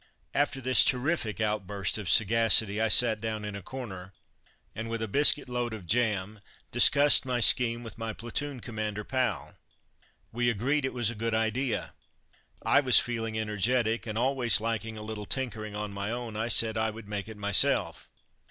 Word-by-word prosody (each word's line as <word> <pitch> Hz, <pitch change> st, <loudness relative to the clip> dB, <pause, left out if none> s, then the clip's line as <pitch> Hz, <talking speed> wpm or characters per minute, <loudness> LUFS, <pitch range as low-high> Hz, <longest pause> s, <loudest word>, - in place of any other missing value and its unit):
After 140 Hz, -1 st, -1 dB
this 130 Hz, 0 st, +5 dB
terrific 125 Hz, -4 st, -1 dB
outburst 105 Hz, -1 st, -1 dB
of 100 Hz, -4 st, -5 dB
sagacity 110 Hz, +1 st, +4 dB
I 110 Hz, -, +2 dB
sat 110 Hz, 0 st, +4 dB
down 110 Hz, -2 st, -4 dB
in 105 Hz, -1 st, -6 dB
a 100 Hz, -, -7 dB
corner 95 Hz, -6 st, -9 dB, 0.6 s
and, 115 Hz, +1 st, -6 dB
with 115 Hz, 0 st, -3 dB
a -, -, -3 dB
biscuitload 125 Hz, -1 st, +1 dB
of 105 Hz, -5 st, -8 dB
jam, 105 Hz, -1 st, -1 dB, 0.3 s
discussed 145 Hz, +1 st, +5 dB
my 125 Hz, -2 st, -2 dB
scheme 115 Hz, +2 st, +3 dB
with 115 Hz, 0 st, -10 dB
my 115 Hz, 0 st, -4 dB
platoon 125 Hz, +4 st, -5 dB
commander 110 Hz, -3 st, -5 dB
pal. 130 Hz, +2 st, -3 dB, 0.7 s
We 120 Hz, +1 st, 0 dB
agreed 130 Hz, +6 st, 0 dB
it 130 Hz, -, -3 dB
was 120 Hz, -3 st, 0 dB
a -, -, -7 dB
good 115 Hz, +1 st, -3 dB
idea. 115 Hz, +2 st, -2 dB, 0.7 s
I -, -, +4 dB
was 130 Hz, -4 st, +5 dB
feeling 115 Hz, -2 st, -3 dB
energetic, 110 Hz, +2 st, -1 dB
and 110 Hz, 0 st, -4 dB
always 125 Hz, -2 st, +2 dB
liking 115 Hz, 0 st, -4 dB
a 105 Hz, -, -8 dB
little 105 Hz, -1 st, -7 dB
tinkering 110 Hz, -5 st, -4 dB
on 105 Hz, 0 st, -5 dB
my 100 Hz, +1 st, -4 dB
own, 120 Hz, -2 st, -5 dB
I 110 Hz, +2 st, -2 dB
said 110 Hz, -1 st, +2 dB
I 110 Hz, 0 st, 0 dB
would 110 Hz, -1 st, -10 dB
make 105 Hz, 0 st, -5 dB
it 110 Hz, -1 st, -10 dB
myself. 100 Hz, -1 st, +1 dB
115 Hz, 170 wpm, -28 LUFS, 105-120 Hz, 0.7 s, this